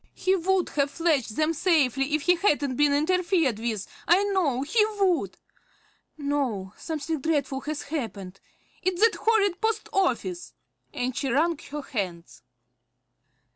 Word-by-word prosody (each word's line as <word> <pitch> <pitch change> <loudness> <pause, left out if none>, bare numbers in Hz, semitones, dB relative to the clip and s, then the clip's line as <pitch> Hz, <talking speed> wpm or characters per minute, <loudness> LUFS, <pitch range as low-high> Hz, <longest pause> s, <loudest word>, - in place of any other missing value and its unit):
He 375 +1 +2
would 375 0 +1
have 280 -1 0
fetched 290 -9 0
them 315 +1 +1
safely 290 -4 +2
if 305 - -2
he 355 - +5
hadn't 290 -8 +1
been 290 +2 +3
interfered 325 - +1
with, 220 -4 -2 0.2
I 360 +4 +5
know 350 -11 0
he 425 +10 +3 0.2
would! 370 -4 +1 0.8
No, 270 -10 -2
something 315 -1 -4
dreadful 285 -3 -1
has 300 -1 -4
happened, 210 - -5 0.4
it's 365 -1 -1
that 455 +1 +5
horrid 415 -5 +2
post 445 -1 -1
office!" 230 - -1 0.4
and 250 0 -3
she 275 - -2
wrung 320 +7 +2
her 295 0 -5
hands. 180 -9 -5
300 Hz, 135 wpm, -26 LUFS, 260-355 Hz, 0.8 s, he